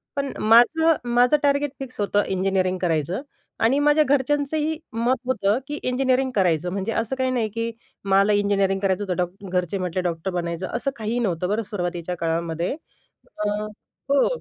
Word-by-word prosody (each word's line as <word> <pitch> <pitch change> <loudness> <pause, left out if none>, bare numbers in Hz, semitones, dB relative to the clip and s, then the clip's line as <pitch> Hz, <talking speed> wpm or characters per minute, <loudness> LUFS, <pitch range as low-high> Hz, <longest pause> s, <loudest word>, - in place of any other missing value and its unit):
पण 280 -1 -2
माझं 300 +9 +5
माझं 245 +4 +4
टार्गेट 285 0 +2
फिक्स 255 -3 -8
होतं 205 0 +2
इंजिनिअरिंग 185 -1 0
करायचं 170 - 0 0.4
आणि 260 +5 +4
माझ्या 295 +1 +4
घरच्यांचंही 290 +3 0 0.2
मत 235 +3 +1
होतं 210 -4 +1
की 295 - -4
इंजिनिअरिंग 260 +1 +1
करायचं. 180 -3 +2
म्हणजे 195 +3 -2
असं 230 +3 -1
काही 260 0 +1
नाही 230 -4 0
की 230 +2 -3 0.3
मला 195 +1 +4
इंजिनिअरिंग 200 -1 +2
करायचं 195 0 0
होतं, 185 -3 -2
डॉ 180 - +2 0.2
घरचे 180 +1 -1
म्हटले 185 -1 -2
डॉक्टर 175 +1 -2
बनायचं, 170 0 -3
असं 275 +3 -1
काहीही 225 +2 -2
नव्हतं 180 -5 -1
बरं 220 +2 0
सुरुवातीच्या 175 -3 -4
काळामध्ये 165 - -1 0.7
अ, - - +2 0.6
हो. 280 0 +4
205 Hz, 160 wpm, -23 LUFS, 185-260 Hz, 0.7 s, माझं